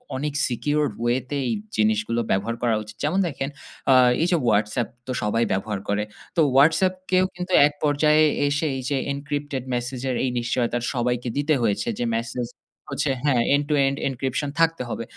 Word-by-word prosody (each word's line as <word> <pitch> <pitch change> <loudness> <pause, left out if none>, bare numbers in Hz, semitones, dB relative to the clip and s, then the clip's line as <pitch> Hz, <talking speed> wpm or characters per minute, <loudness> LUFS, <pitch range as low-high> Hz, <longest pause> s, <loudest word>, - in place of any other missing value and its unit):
অনেক 145 +2 -2
secured 145 +1 0
way 120 +1 +2
তে 145 - -2
এই - - +1 0.2
জিনিসগুলো 110 +2 +1
ব্যবহার 105 +5 0
করা 120 -2 +2
উচিত। 105 0 -12
যেমন 160 +7 +1
দেখেন 140 -3 -3 0.4
আ - - +8 0.3
এই 170 - +3
যে 175 - +4
WhatsApp 105 +3 +1 0.2
তো - - -3
সবাই 115 +3 +1
ব্যবহার 100 +1 -1
করে। 100 +1 +1 0.3
তো 165 - +4 0.2
WhatsApp 165 +6 +5 0.2
কেও 185 0 +4
কিন্তু 180 +1 -4
এক 150 - -7
পর্যায়ে 150 +1 +4 0.2
এসে 145 +2 0
এই 130 - -5
যে 140 - +1 0.2
encrypted 145 -2 -4
message 125 +1 -3
এর 125 - 0
এই 130 - +1
নিশ্চয়তার 120 0 -1
সবাইকে 125 0 -1
দিতে 145 +2 +2
হয়েছে 105 -1 0
যে 120 - 0
message 120 +1 -4 0.4
হচ্ছে 140 - 0
হ্যাঁ, 130 -5 +3
end 145 - 0
to 150 - +3
end 140 +1 -1
encryption 135 +2 -2
থাকতে 165 -5 +2
হবে। 115 - -3
130 Hz, 180 wpm, -24 LUFS, 115-145 Hz, 0.4 s, আ